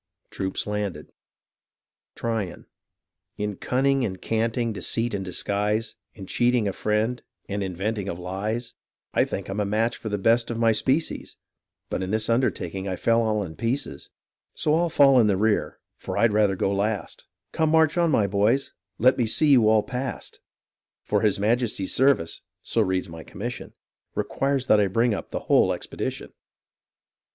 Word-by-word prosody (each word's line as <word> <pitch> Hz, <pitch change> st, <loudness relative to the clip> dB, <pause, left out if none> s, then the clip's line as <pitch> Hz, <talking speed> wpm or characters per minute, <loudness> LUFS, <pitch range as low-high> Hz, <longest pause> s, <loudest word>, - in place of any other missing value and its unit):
Troops 95 Hz, 0 st, -3 dB
landed 105 Hz, -7 st, -4 dB, 1.0 s
Tryon 110 Hz, -6 st, -3 dB, 0.7 s
In 105 Hz, -1 st, -2 dB
cunning 135 Hz, +5 st, +1 dB
and 95 Hz, -5 st, -3 dB
canting, 115 Hz, +1 st, -1 dB
deceit 115 Hz, +3 st, -1 dB
and 100 Hz, -1 st, -2 dB
disguise, 105 Hz, +4 st, -1 dB, 0.2 s
In 100 Hz, -, -9 dB
cheating 120 Hz, +1 st, +2 dB
a 100 Hz, -, -1 dB
friend, 110 Hz, +5 st, 0 dB, 0.3 s
and 100 Hz, 0 st, -3 dB
inventing 100 Hz, +2 st, -2 dB
of 85 Hz, -, -4 dB
lies, 105 Hz, +6 st, -4 dB, 0.4 s
I -, -, +3 dB
think -, -, -5 dB
I'm 95 Hz, +2 st, -4 dB
a 105 Hz, -, +1 dB
match 110 Hz, +3 st, 0 dB
for 110 Hz, -, -6 dB
the 105 Hz, -, -1 dB
best 115 Hz, +4 st, +2 dB
of 120 Hz, -, -3 dB
my 115 Hz, -1 st, +4 dB
species, 135 Hz, +8 st, -1 dB, 0.5 s
But -, -, -3 dB
in 95 Hz, -, -3 dB
this 110 Hz, +2 st, 0 dB
undertaking 100 Hz, -6 st, -1 dB
I 95 Hz, -, -2 dB
fell 115 Hz, +5 st, +2 dB
all 110 Hz, -2 st, 0 dB
in 80 Hz, -4 st, -8 dB
pieces; 115 Hz, -, -3 dB, 0.5 s
So 150 Hz, -, +1 dB
I'll 170 Hz, +2 st, +2 dB
fall 135 Hz, -4 st, +6 dB
in 110 Hz, -, +5 dB
the 100 Hz, -2 st, +2 dB
rear, 105 Hz, +1 st, +1 dB, 0.2 s
for -, -, -5 dB
I'd 110 Hz, 0 st, +3 dB
rather 105 Hz, -2 st, +3 dB
go 100 Hz, +1 st, 0 dB
last: 100 Hz, +1 st, -3 dB, 0.2 s
Come, 160 Hz, -1 st, +1 dB
march 160 Hz, -1 st, +4 dB
oti 170 Hz, -2 st, +2 dB
7>iy 100 Hz, -7 st, +2 dB
boys, 105 Hz, +7 st, +1 dB, 0.2 s
let 130 Hz, +3 st, +4 dB
ine 120 Hz, -, +2 dB
see 150 Hz, +6 st, +3 dB
you 120 Hz, -5 st, +6 dB
all 110 Hz, -1 st, +4 dB
past, 125 Hz, -3 st, -5 dB, 0.6 s
For 105 Hz, -1 st, 0 dB
his 105 Hz, -3 st, +2 dB
Majesty's 110 Hz, -2 st, 0 dB
service 130 Hz, -11 st, +2 dB, 0.2 s
(so -, -, +1 dB
reads 95 Hz, 0 st, 0 dB
my 80 Hz, -1 st, -9 dB
commission) 120 Hz, +5 st, -6 dB, 0.4 s
Requires 135 Hz, -1 st, -1 dB
that 110 Hz, -, +5 dB
I 100 Hz, -, +3 dB
bring 115 Hz, +4 st, +2 dB
up -, -, -5 dB
the -, -, -4 dB
whole -, -, +3 dB
expedition. -, -, -5 dB
110 Hz, 165 wpm, -25 LUFS, 100-120 Hz, 1.0 s, fall